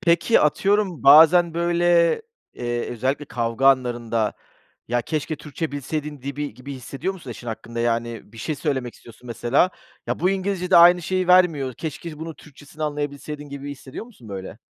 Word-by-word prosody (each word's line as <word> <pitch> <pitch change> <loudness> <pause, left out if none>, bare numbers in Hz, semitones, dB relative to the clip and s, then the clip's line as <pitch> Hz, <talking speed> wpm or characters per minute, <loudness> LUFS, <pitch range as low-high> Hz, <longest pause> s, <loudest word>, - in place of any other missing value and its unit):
Peki, 170 +6 +3
atıyorum, 195 +3 +1
bazen, 165 +4 +7
böyle, 170 - +2 0.3
eee, 120 -1 -3
özellikle 130 +5 -2
kavga 120 0 -1
anlarında, 120 -4 +1 0.6
ya, 120 +1 0
keşke 155 +3 -3
Türkçe 150 +1 -5
bilseydin 145 0 -4
dibi 140 -2 -4
gibi 135 +3 -8
hissediyor 135 +8 -4
musun 160 -10 -10
eşin 120 - -9
hakkında? 115 +1 -5
Yani, 115 -2 -2
bir 115 - -13
şey 155 +7 -3
söylemek 130 -5 -2
istiyorsun, 120 +1 -16
mesela, 120 +8 +1 0.4
ya, - - -2
bu 180 +3 +3
İngilizce'de 190 -2 +1
aynı 175 +1 +7
şeyi 185 +1 -1
vermiyor. 165 -8 +4
Keşke 160 0 -6
bunun 160 0 -6
Türkçesini 150 +1 -12
anlayabilseydin 145 0 -4
gibi 140 0 -7
hissediyor 135 +6 -8
musun, 195 - -16
böyle? 95 -2 -7
145 Hz, 155 wpm, -23 LUFS, 125-170 Hz, 0.6 s, bazen